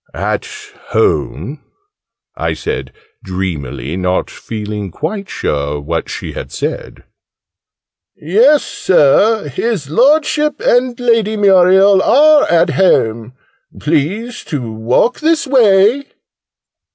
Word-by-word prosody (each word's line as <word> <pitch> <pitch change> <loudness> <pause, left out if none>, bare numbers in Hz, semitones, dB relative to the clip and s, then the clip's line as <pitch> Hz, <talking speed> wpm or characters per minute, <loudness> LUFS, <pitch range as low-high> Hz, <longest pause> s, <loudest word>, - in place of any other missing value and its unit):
"At - - -3 0.4
home?" 420 -2 -1 0.7
I - - -2
said 440 +1 -5 0.3
dreamily, 85 -6 -5
not 90 0 -1
feeling 105 -2 -6
quite 195 - -5
sure 75 0 -3
what 70 - -4
she - - -6
had - - -8
said. - - -5 1.1
"Yes, 235 - +3
Sir. 190 +4 +2
His 150 - -3
Lordship 300 - +2
and 245 0 +1
Lady 230 -3 +1
Muriel 190 0 +4
are 300 +4 +4
at 170 -1 +2
home. 115 - +1 0.5
Please 175 - -2
to 125 -8 -5
walk 120 - 0
this 320 +1 +1
way." 235 0 +3
195 Hz, 100 wpm, -14 LUFS, -, 1.1 s, Muriel